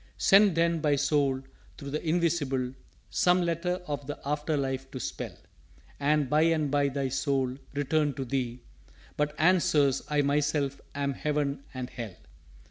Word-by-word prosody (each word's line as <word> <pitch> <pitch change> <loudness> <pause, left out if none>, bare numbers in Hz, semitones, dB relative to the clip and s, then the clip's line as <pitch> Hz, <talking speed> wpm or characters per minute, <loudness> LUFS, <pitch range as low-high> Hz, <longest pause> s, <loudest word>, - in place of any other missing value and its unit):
"_Send 195 -2 +6
then 165 -1 +2
thy 150 -2 +3
Soul 140 -2 +1 0.3
through 140 0 -7
the 150 - -3
Invisible 155 -6 0 0.4
Some 180 0 +3
letter 180 +2 -1
of 145 -3 -4
the 145 - -4
After 150 +1 -1
life 135 -1 -2
to 130 - -6
spell: - - -5 0.6
And 145 0 +2
by 150 +4 +3
and 160 -3 +2
by 145 -1 +2
thy 135 -1 -2
Soul 135 -1 0 0.2
returned 145 0 +1
to 135 - -3
thee 125 -2 -2 0.5
But 150 0 -1
answers, 155 -6 +3
'I 150 -1 +2
myself 145 -1 0
am 140 -1 -1
Heaven 145 -1 -2
and 130 -1 -6
Hell.' 115 -6 -6
145 Hz, 150 wpm, -28 LUFS, 135-155 Hz, 0.6 s, Send